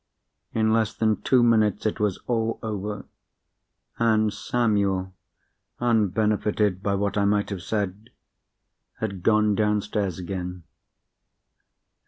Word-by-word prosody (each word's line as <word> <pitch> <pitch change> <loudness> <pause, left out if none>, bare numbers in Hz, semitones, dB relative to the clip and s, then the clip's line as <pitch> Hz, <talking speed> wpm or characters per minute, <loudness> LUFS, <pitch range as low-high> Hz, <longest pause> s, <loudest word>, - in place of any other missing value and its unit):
In 110 0 +2
less 110 -2 +1
than 110 -1 +1
two 125 -2 +4
minutes 110 -4 +3
it 110 - -1
was 105 -3 0
all 115 -2 0
over—and 110 +1 -3
Samuel 100 -6 0 0.7
(unbenefited 105 -3 +1
by 100 -1 0
what 100 +1 0
I 100 - +2
might 105 0 +1
have 95 -3 -4
said) 105 +1 -3 0.9
had 100 -4 -3
gone 105 +1 +3
downstairs 105 -3 0
again. 90 -1 -5
105 Hz, 105 wpm, -25 LUFS, 100-110 Hz, 0.9 s, two